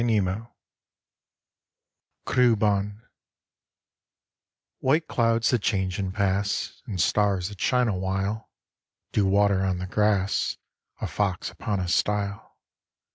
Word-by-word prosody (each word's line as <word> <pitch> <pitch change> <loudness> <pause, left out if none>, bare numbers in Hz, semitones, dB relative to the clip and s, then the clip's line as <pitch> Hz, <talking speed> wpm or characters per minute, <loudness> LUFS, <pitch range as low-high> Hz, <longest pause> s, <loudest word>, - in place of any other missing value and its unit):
IN - - +1
CAMP 105 +1 0 1.8
CREWBAWN 105 -4 +2 1.8
White 155 +5 +2
clouds 115 0 +2
that 120 -4 +2
change 95 -3 0
and 95 -2 -2
pass, 100 0 -1
And 95 -4 -4
stars 100 +1 +2
that 100 -2 -11
shine 125 -2 +3
awhile, 95 +2 -2 0.6
Dew 100 -2 +2
water 100 0 +3
on 95 -1 0
the 90 - -4
grass, 100 0 +1 0.4
A - - -1
fox 100 -4 -1
upon 100 -2 -3
a 90 - -2
stile. 100 +2 -1
100 Hz, 110 wpm, -26 LUFS, 95-110 Hz, 1.8 s, shine